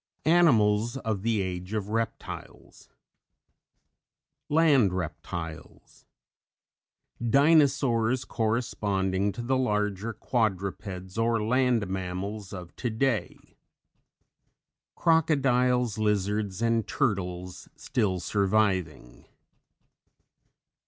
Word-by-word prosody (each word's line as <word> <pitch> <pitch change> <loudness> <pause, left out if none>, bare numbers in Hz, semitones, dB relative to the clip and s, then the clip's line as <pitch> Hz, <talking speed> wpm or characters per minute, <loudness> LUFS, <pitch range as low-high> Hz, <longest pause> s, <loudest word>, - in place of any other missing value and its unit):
ANIMALS 120 -9 +4
OF 110 -6 -3
THE 110 -2 0
AGE 90 +1 -5
OF 105 -2 -2
REPTILES. 115 +1 -5 1.6
LAND 145 - +4
REPTILES. 85 -1 -7 1.2
DINOSAURS 135 -2 +3
corresponding 100 -4 -1
to 120 +5 -6
the 130 +2 +1
larger 105 -2 -1
quadrupeds 100 -4 -3
or 115 -1 +1
land 125 -1 +2
mammals 95 +2 -4
of 90 -3 -9
today. 120 0 -2 1.4
CROCODILES, 125 -8 +2
LIZARDS 105 0 0
AND 115 -1 +1
TURTLES 90 - -2
still 105 -7 -1
surviving. 95 - -1
110 Hz, 70 wpm, -27 LUFS, 95-125 Hz, 1.6 s, ANIMALS